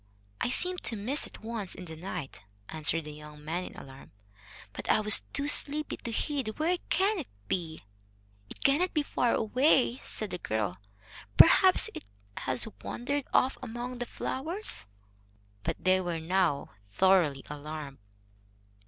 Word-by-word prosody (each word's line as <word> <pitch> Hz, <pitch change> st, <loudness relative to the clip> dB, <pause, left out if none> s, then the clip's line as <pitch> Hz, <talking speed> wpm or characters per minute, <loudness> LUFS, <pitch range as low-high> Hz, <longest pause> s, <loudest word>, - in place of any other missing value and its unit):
"I -, -, +1 dB
seemed 360 Hz, +7 st, +2 dB
to 230 Hz, -, 0 dB
miss 240 Hz, +8 st, -1 dB
it -, -, -14 dB
once 220 Hz, -4 st, -4 dB
in 185 Hz, -, -8 dB
the 160 Hz, -2 st, -7 dB
night," 160 Hz, -, -6 dB, 0.3 s
answered 160 Hz, +1 st, 0 dB
the 150 Hz, -, -8 dB
young 150 Hz, 0 st, -12 dB
man 175 Hz, +4 st, -2 dB
in -, -, -10 dB
alarm, 135 Hz, 0 st, -12 dB, 0.6 s
"but -, -, -7 dB
I -, -, +5 dB
was 215 Hz, 0 st, +6 dB
too 285 Hz, 0 st, -1 dB
sleepy 295 Hz, +1 st, +2 dB
to -, -, -6 dB
heed. 255 Hz, -1 st, -2 dB
Where 340 Hz, +4 st, +1 dB
can 390 Hz, +3 st, +2 dB
it 290 Hz, -, -5 dB, 0.2 s
be?" 160 Hz, -, -3 dB, 0.7 s
"It -, -, -8 dB
cannot 330 Hz, +7 st, +3 dB
be 300 Hz, -, +3 dB
far 245 Hz, -4 st, +1 dB
away," 250 Hz, +2 st, +3 dB
said 215 Hz, -6 st, -6 dB
the 180 Hz, -, -4 dB
girl. 105 Hz, -, -2 dB, 0.6 s
"Perhaps -, -, +7 dB
it -, -, -8 dB, 0.3 s
has 130 Hz, -, 0 dB
wandered 280 Hz, +3 st, -2 dB
off 260 Hz, -, +3 dB
among 245 Hz, 0 st, -5 dB
the 245 Hz, -, -3 dB
flowers." 315 Hz, -, -4 dB, 0.7 s
But -, -, -4 dB
they 185 Hz, 0 st, +4 dB
were 175 Hz, -2 st, -2 dB
now 170 Hz, -3 st, +1 dB, 0.2 s
thoroughly 170 Hz, -, +3 dB
alarmed. 150 Hz, -1 st, -7 dB
200 Hz, 155 wpm, -30 LUFS, -, 0.7 s, Perhaps